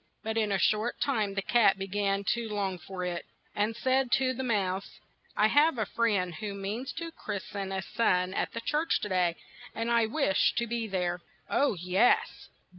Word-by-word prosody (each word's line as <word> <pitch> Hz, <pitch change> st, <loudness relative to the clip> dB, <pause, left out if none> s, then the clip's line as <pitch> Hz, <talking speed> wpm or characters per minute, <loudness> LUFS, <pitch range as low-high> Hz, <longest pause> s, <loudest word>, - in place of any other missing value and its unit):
But 220 Hz, 0 st, -2 dB
in 215 Hz, -2 st, +1 dB
a 195 Hz, -, +2 dB
short 215 Hz, +5 st, +1 dB
time 215 Hz, -8 st, 0 dB
the 195 Hz, -, -1 dB
cat 210 Hz, 0 st, +4 dB
be 195 Hz, -, -3 dB
gan 200 Hz, 0 st, 0 dB
to 235 Hz, -1 st, -4 dB
long 195 Hz, -3 st, -2 dB
for 180 Hz, +2 st, -6 dB
it, 175 Hz, -1 st, -3 dB, 0.3 s
and 210 Hz, +2 st, 0 dB
he -, -, -11 dB
said 260 Hz, -1 st, +2 dB
to 260 Hz, -1 st, +3 dB
the 260 Hz, -, -4 dB
mouse, 195 Hz, -6 st, -1 dB, 0.4 s
"I 210 Hz, -, +5 dB
have 290 Hz, +5 st, +4 dB
a 220 Hz, -, 0 dB
friend 200 Hz, -5 st, 0 dB
who 200 Hz, +5 st, -5 dB
means 210 Hz, +7 st, -4 dB
to 335 Hz, -1 st, -5 dB
christ 200 Hz, -9 st, -6 dB
en 195 Hz, -1 st, -3 dB
a 190 Hz, -1 st, -2 dB
son 185 Hz, -5 st, +1 dB
at -, -, -1 dB
the 230 Hz, -, -4 dB
church 300 Hz, +7 st, +1 dB
to 210 Hz, -, -3 dB
day, 180 Hz, -3 st, +2 dB, 0.4 s
and 230 Hz, +1 st, -1 dB
I 230 Hz, -1 st, +3 dB
wish 235 Hz, -5 st, +2 dB
to 235 Hz, -, +1 dB
be 230 Hz, -1 st, -2 dB
there." 180 Hz, -3 st, -1 dB, 0.3 s
"Oh, 280 Hz, -6 st, +2 dB
yes 180 Hz, +7 st, +1 dB
210 Hz, 200 wpm, -29 LUFS, 190-235 Hz, 0.4 s, I